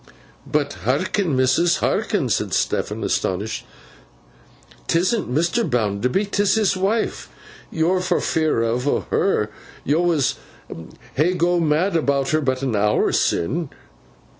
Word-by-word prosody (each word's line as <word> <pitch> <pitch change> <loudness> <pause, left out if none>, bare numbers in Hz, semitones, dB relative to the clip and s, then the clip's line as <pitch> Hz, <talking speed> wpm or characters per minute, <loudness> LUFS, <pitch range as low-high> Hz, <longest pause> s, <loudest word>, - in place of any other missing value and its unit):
'But 145 -1 0
hearken, 155 - 0
missus, 130 +7 +3
hearken,' - - 0
said - - 0
Stephen, - - -1
astonished. 100 +4 -2 1.2
''Tisn't 185 - +1
Mr. 170 - +1
Bounderby; 120 - 0
'tis 200 -1 +1
his 215 -4 +2
wife. 200 +5 -1 0.4
Yo'r 170 +3 +1
not 180 -1 0
fearfo' 125 -5 0
o' - - +2
her. 105 - +1 0.3
Yo 150 +4 +1
was 165 -7 +1 0.8
hey 170 +6 +1
go 175 0 +2
mad 165 +4 +1
about 140 -4 +1
her, 155 0 +2
but 130 -1 -1
an 130 -5 0
hour 105 +1 +2
sin. 150 - 0
155 Hz, 120 wpm, -21 LUFS, 130-180 Hz, 1.2 s, missus